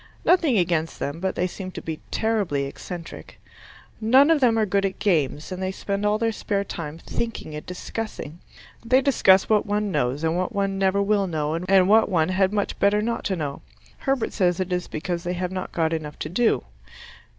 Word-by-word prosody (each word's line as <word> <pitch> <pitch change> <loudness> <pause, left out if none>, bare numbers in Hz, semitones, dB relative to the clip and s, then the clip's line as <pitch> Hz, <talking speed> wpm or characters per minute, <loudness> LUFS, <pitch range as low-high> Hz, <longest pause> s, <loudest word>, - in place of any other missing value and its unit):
Nothing 330 -10 +4
against 170 -3 0
them, 145 +3 -4
but 190 +1 -2
they 180 - 0
seem 185 +1 -5
to - - -5
be 160 -1 -5
terribly 205 -11 0
eccentric. 165 +4 -9 0.6
None 260 +8 +6
of 320 - +4
them 235 -3 +4
are 220 - +3
good 200 0 +1
at 195 -1 -1
games, 155 -5 0
and 185 0 -5
they 190 0 -1
spend 200 +1 -2
all 210 +1 +2
their 225 0 0
spare 200 -2 -2
time 165 -5 -6
thinking 225 -3 -5
and 150 - -6
discussing. 180 -3 -6 0.4
They 255 +3 +4
discuss 195 -8 +4
what 215 -1 +2
one 205 0 0
knows 145 -1 -1
and 160 +1 +1
what 185 +3 -2
one 195 -1 0
never 195 +1 +2
will 200 -1 +2
know 155 -3 -1
and 185 +2 +3
what 220 +2 +5
one 165 -4 +2
had 190 +1 +2
much 205 -1 -2
better 210 +1 +3
not 230 -1 -2
know. 155 -7 -3 0.4
Herbert 270 -3 -1
says 180 -3 +1
it 185 -1 -1
is 180 0 -2
because 170 +2 -4
they 175 - -2
have 180 0 -3
not 185 0 -4
got 160 -1 0
enough 150 -2 -4
to 155 - -5
do. 225 +7 +2
190 Hz, 200 wpm, -24 LUFS, 165-210 Hz, 0.6 s, None